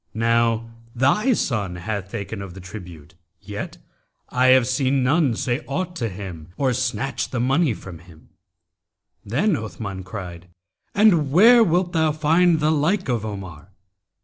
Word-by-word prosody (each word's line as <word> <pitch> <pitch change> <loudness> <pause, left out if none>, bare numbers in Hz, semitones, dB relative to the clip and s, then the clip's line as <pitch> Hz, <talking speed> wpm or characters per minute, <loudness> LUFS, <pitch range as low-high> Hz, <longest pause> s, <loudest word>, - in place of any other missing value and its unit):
Now 115 0 +1 0.3
thy 210 - +3
son 105 - -1
hath 95 +1 -4
taken 100 +1 -5
of 95 -3 -9
the - - -9
tribute, 90 -6 -11 0.3
yet 105 -1 -7 0.5
I 130 +1 +2
have 130 -1 +6
seen 130 +1 +1
none 140 -2 +2
say 125 +5 -2
aught 175 +5 -3
to 115 -3 -2
him 90 -5 -8
or 130 -3 +1
snatch 130 0 -2
the 125 - -3
money 135 +1 +2
from 90 -4 -10
him.' 85 -2 -18 0.9
Then 160 - +1
Othman[FN#276] 105 -6 -5
cried, 90 -3 -8 0.5
'And 175 -9 +4
where 230 - +7
wilt 175 -1 +1
thou 160 -2 +2
find 160 +2 +3
the 155 +1 +2
like 160 +4 0
of 120 -4 0
Omar?' 95 -4 -8
120 Hz, 150 wpm, -22 LUFS, 100-155 Hz, 0.9 s, where